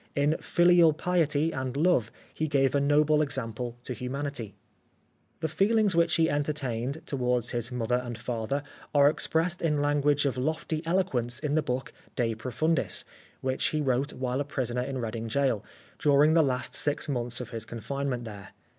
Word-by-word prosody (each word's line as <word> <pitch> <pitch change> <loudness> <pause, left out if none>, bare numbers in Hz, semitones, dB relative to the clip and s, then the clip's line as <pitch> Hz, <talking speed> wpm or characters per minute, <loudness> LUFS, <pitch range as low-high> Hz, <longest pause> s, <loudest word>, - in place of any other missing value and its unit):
In 145 +2 +2
filial 175 -2 +5
piety 160 -2 +1
and 130 0 -3
love 150 -8 +2 0.2
he 155 - -1
gave 135 -3 +2
a 140 - +3
noble 150 +1 +4
example 120 -4 -3
to 125 - -4
humanity. 125 -3 -4 0.9
The 160 - +1
feelings 200 +4 +2
which 170 -1 +3
he 165 -1 +3
entertained 145 -1 -2
towards 125 -4 0
his 120 +1 -2
mother 125 0 0
and 120 -2 -6
father 120 +4 -3 0.3
are 140 0 +7
expressed 165 +3 +1
in 150 -3 +1
language 145 0 +2
of 135 -2 0
lofty 155 +2 -2
eloquence 135 -10 0
in 150 -2 -2
the 155 - +3
book, 130 -2 -3
" - - -29
De 115 -3 0
Profundis," 130 +8 -1 0.4
which 130 0 -1
he 155 - -1
wrote 135 0 0
while 130 +1 -2
a - - +1
prisoner 125 -4 -2
in 135 +1 -3
Reading 115 -1 -4
Gaol, 130 -2 +1 0.4
during 150 +1 +5
the 165 - +6
last 130 -4 0
six 145 +1 +1
months 120 -3 -2
of 125 - -7
his 115 -2 -4
confinement 125 +2 -3
there. 100 -3 -9
140 Hz, 170 wpm, -28 LUFS, 125-155 Hz, 0.9 s, are